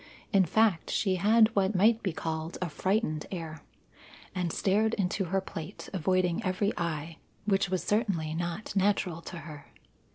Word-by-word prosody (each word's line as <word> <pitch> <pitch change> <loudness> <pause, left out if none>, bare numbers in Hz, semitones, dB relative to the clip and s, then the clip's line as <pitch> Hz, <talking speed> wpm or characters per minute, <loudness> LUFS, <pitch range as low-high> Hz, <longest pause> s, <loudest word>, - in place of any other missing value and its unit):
In 195 -2 +5
fact, 210 0 +2
she 190 -3 +1
had 220 +4 +4
what 195 +1 +2
might 220 +5 +4
be 190 - -1
called 160 0 -4
a 180 - -2
frightened 185 -2 -1
air, 160 -4 -6 0.7
and 180 -3 -1
stared 215 +6 +2
into 195 0 0
her 195 +3 +1
plate, 160 -4 -8
avoiding 185 +2 +1
every 200 +2 0
eye, 165 -2 -3 0.3
which 195 -2 +2
was 185 -2 -1
certainly 185 -7 0
not 175 +6 -4
natural 190 -4 +1
to 175 - -8
her. 150 -4 -10
185 Hz, 155 wpm, -29 LUFS, 165-200 Hz, 0.7 s, In